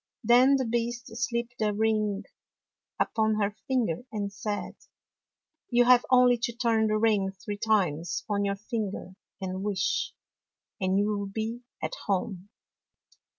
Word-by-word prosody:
Then 250 +4 +6
the 265 -1 +1
Beast 235 0 -2
slipped 235 -1 -2
a 210 -1 +2
ring 215 -1 +1 0.8
upon 220 -1 +1
her 205 -1 0
finger 240 -11 0
and 205 -2 -3
said, 205 +1 -4 1.0
"You 245 0 +4
have 250 0 +6
only 250 -1 +5
to 235 0 -2
turn 225 -2 +2
the 215 0 +1
ring 210 -3 +2
three 205 +2 -6
times 180 -8 0
on 205 -1 0
your 200 0 0
finger 205 -3 -4 0.3
and 185 -1 -4
wish, 195 -2 -1 0.6
and 185 0 +1
you 205 - +3
will 205 -1 -1
be 220 +4 -4 0.2
at - - -2
home. 195 -1 -2
215 Hz, 140 wpm, -28 LUFS, 200-235 Hz, 1.0 s, Then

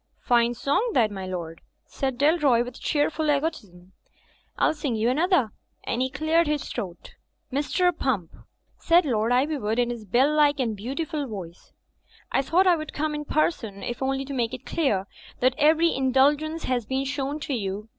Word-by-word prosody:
'Tine 240 0 +3
song 285 - 0
that, 220 -4 +3
my 190 -2 -6
lord,'' 170 -3 -6 0.2
said 265 -2 -3
Dalroy, 285 -5 +3
with 245 -1 -10
cheer 295 0 +1
ful 310 -1 -1
egotism. 230 - -2 0.7
"I'll - - +3
sing 290 -6 -3
you 225 +3 +1
another," 310 - +2 0.3
and 245 - -2
he 260 - +1
cleared 315 +4 +1
his 300 -1 -1
throat. 185 -7 -7 0.4
"Mr. 355 +5 +1
Pump," 215 - -1 0.5
said 340 0 +4
Loi;(i 245 +1 +2
Ivywood, 245 -8 -2
in 240 -1 +1
his 230 -3 -7
bell 260 +9 +2
like 295 -1 +3
and 230 -4 0
beautiful 285 - -4
voice, 185 -7 -9 0.6
"I - - +2
thought 335 +8 +2
I 360 -2 +5
would 310 0 -7
come 305 0 -1
in 295 0 -4
person, 230 - -1
if 240 +1 -5
only 270 0 -1
to 280 - -6
make 245 -1 -1
it 255 - -13
clear 215 - 0 0.3
that 255 +1 +3
every 320 +3 +4
indulgence 285 +5 +2
has 245 -4 -1
been 265 +1 -1
shown 280 +1 -3
you. 210 -5 -3
265 Hz, 175 wpm, -25 LUFS, 230-300 Hz, 0.7 s, I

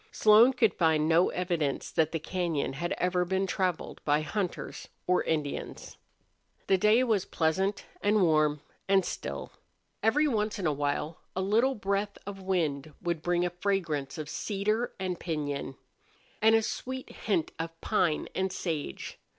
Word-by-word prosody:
Slone 220 +4 +6
could 230 -4 +3
find 160 -2 +2
no 165 +2 +4
evidence 170 -6 -1
that 160 -1 +2
the 165 - -1
cañon 165 -5 -2
had 170 +6 -2
ever 180 0 +1
been 190 +2 0
traveled 185 -3 -2
by 150 +1 +2
hunters 180 +3 -4 0.2
or 180 0 +3
Indians. 150 -3 -3 0.7
The 190 -1 +3
day 215 +5 +5
was 220 -6 +1
pleasant 190 +5 0 0.2
and 205 -1 +3
warm 155 -3 +3 0.3
and 195 -2 +4
still. - - -5 0.5
Every 300 +7 +3
once 215 -4 0
in 195 - -3
a 155 - +2
while 145 +2 -2 0.2
a 190 - 0
little 230 +7 +3
breath 200 0 -1
of 195 -1 -7
wind 155 -6 -1
would 170 -2 -2
bring 175 +1 +1
a 175 - -1
fragrance 175 -7 -1
of 155 -2 -5
cedar 215 +7 -1
and 185 -2 -2
piñon, 145 -5 -3 0.7
and 220 +1 +6
a 225 - +3
sweet 260 +3 -4
hint 190 -7 -1
of 165 0 -5
pine 180 -8 +1
and 190 0 -1
sage. 160 - -4
180 Hz, 155 wpm, -29 LUFS, 160-205 Hz, 0.7 s, Slone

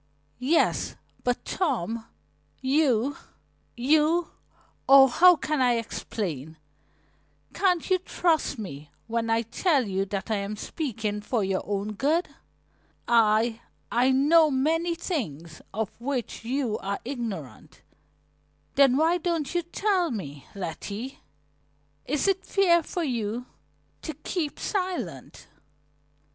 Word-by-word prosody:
"Yes, 280 +7 +2 0.3
but 245 -1 -1
Tom, 230 - -1 0.5
you 270 -2 +2 0.6
you 310 +6 +3 0.6
Oh, 270 0 +10
how 355 +8 +6
can 305 -2 -1
I 250 -1 +4
explain? 170 - -4 1.0
Can't 360 -2 +1
you 370 -1 +3
trust 335 -5 0
me 150 -9 -7 0.2
when 230 0 -2
I 225 +1 +2
tell 270 - +1
you 195 0 -1
that 195 +2 -4
I 215 - +2
am 200 +1 -3
speaking 215 -5 -3
for 220 +1 -1
your 190 0 0
own 205 +1 -2
good? 305 - +1 0.8
I 225 0 +3 0.3
I 245 +2 +3
know 300 +4 +5
many 325 +5 +1
things 170 - -4
of 220 0 -2
which 250 -4 -3
you 245 -2 -1
are 200 +1 -3
ignorant." 230 - -6 0.9
"Then 270 -2 +5
why 330 +4 +3
don't 330 -4 -1
you 350 - +1
tell 360 +1 0
me, 145 - -6
Letty? 200 +7 -5 0.9
Is 300 +5 0
it 390 -1 +1
fair 350 -4 +4
for 345 +2 -3
you 235 -3 -2 0.6
to 315 - -5
keep 310 0 -3
silent?" 370 -3 -3
255 Hz, 115 wpm, -26 LUFS, 215-320 Hz, 1.0 s, Oh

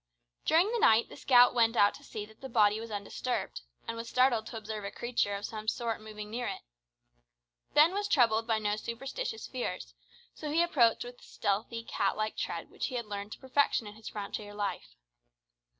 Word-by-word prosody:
During 345 +7 +4
the 475 - 0
night 225 - +5
the - - -10
scout 245 -2 +6
went 230 -1 +3
out 205 -2 +5
to 285 - -13
see 215 -6 -6
that 220 +1 -19
the 265 - -7
body 215 -2 +4
was 230 +1 -7
undisturbed, 210 +4 -3 0.3
and 230 - -3
was 230 0 -6
startled 250 -4 +3
to 225 - -6
observe 215 -1 -5
a 200 - -3
creature 235 -4 -1
of 200 +1 -4
some 215 -1 -6
sort 230 -1 -1
moving 210 -1 -8
near 240 +1 -2
it. - - -4 1.1
Ben 310 +4 +7
was 410 +1 -1
troubled 230 - +3
by 225 -2 +2
no 210 -1 0
superstitious 270 - -4
fears, 240 - -4 0.4
so 300 - -6
he 325 +3 +3
approached 245 -10 +3
with 245 0 -10
the - - -19
stealthy, 220 +3 -2
cat 200 -3 0
like 215 0 -1
tread - - -4
which - - -3
he 255 - -5
had 235 -2 -2
learned 205 0 -5
to - - -11
perfection 265 -3 +2
in 210 - -8
his 220 0 -9
frontier 205 0 -6
life. 205 - -4
230 Hz, 200 wpm, -31 LUFS, 210-250 Hz, 1.1 s, Ben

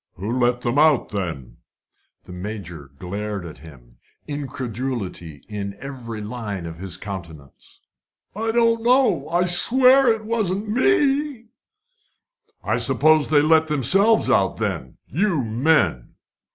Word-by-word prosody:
"Who 110 +7 -3
let 125 0 +1
them 125 +4 0
out, 155 -4 +3
then?" 85 - -5 0.7
The - - -12
Major 90 -6 -8
glared 100 +2 -5
at 80 - -10
him, 65 -6 -16 0.3
incredulity 120 - -5
in 100 -1 -6
every 120 -5 -7
line 105 -5 -6
of 80 -1 -8
his 90 0 -6
countenance. 85 -8 -10 0.5
"I 225 +2 -2
don't 230 0 +2
know. 240 - +2
I'll 175 +2 +1
swear 255 +8 +6
it 220 -1 -3
wasn't 215 -2 -2
me!" 275 - 0 1.1
"I - - 0
suppose 155 -1 +3
they 145 -2 +3
let 160 +1 +3
themselves 190 - +3
out, 95 -1 +1
then. 65 - -4
You 170 -3 -1
men!" 115 - 0
130 Hz, 125 wpm, -21 LUFS, -, 1.1 s, swear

